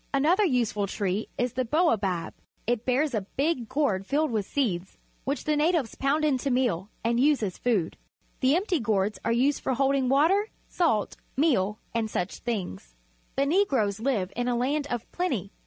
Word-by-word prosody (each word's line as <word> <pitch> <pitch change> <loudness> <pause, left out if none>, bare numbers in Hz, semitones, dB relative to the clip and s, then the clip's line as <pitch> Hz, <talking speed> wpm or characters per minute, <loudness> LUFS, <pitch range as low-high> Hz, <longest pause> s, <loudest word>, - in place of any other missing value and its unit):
Another 330 +9 +3
useful 235 - +1
tree 195 +1 -2
is 245 -1 0
the 255 - 0
baobab. 220 - +1 0.3
It 240 0 -1
bears 265 +3 +1
a 215 - 0 0.2
big 275 -5 0
gourd 260 -9 0
filled 300 0 +1
with 215 -4 -1
seeds, 190 -10 -2 0.3
which 280 +2 -2
the 305 - +1
natives 300 - +1
pound 290 +3 +1
into 275 -2 +1
meal 240 -8 0
and 235 +1 +1
use 285 -2 +3
a.s 190 -3 -3
food. 210 -9 0 0.4
The 265 +3 +3
empty 365 -2 +1
gourds 205 -3 0
are 230 - 0
used 260 +5 +2
for 260 - 0
holding 270 -1 +2
water, 350 +11 +3 0.2
salt, 270 - 0 0.2
meal, 215 - +2 0.2
and 225 -2 -1
such 180 -2 -3
things. 180 - -4 0.4
The 275 - +2
Negroes 275 - +2
live 220 -7 -1
in 245 +1 -1
a 245 - +1
land 280 +4 0
of 240 -4 -4
plenty. 255 - -2
250 Hz, 170 wpm, -27 LUFS, 210-290 Hz, 0.4 s, Another